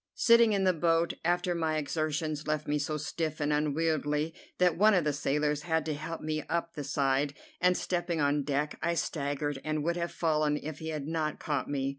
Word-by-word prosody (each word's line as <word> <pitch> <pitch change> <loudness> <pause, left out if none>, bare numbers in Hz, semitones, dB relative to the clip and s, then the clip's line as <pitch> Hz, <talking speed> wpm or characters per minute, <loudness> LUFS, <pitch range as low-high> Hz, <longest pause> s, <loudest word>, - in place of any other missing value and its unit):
Sitting 235 -2 +5
in 195 -1 +1
the 185 -1 +4
boat 165 0 +2
after 175 +1 +1
my 160 -2 0
exertions 155 +1 -2
left 155 0 -1
me 150 0 +1
so 150 +1 -2
stiff 155 0 -3
and 150 0 +1
unwieldy 150 +1 0 0.2
that 180 -2 +3
one 210 +3 +5
of 180 - +3
the 150 -1 +1
sailors 150 +1 0
had 160 -1 0
to 155 - -1
help 155 +3 -5
me 155 0 -2
up 170 0 -1
the 145 - -5
side, 140 +1 0 0.2
and, 180 0 +3
stepping 175 -2 -1
on 145 0 +2
deck, 145 +1 -2
I 170 +1 +1
staggered, 145 -3 -2
and 155 -1 -1
would 170 +2 0
have 170 0 -2
fallen 155 -2 +1
if 155 0 -6
he 160 - -5
had 150 -3 -3
not 155 -1 -2
caught 145 -2 -2
me. 135 -1 -1
155 Hz, 205 wpm, -30 LUFS, 150-165 Hz, 0.2 s, Sitting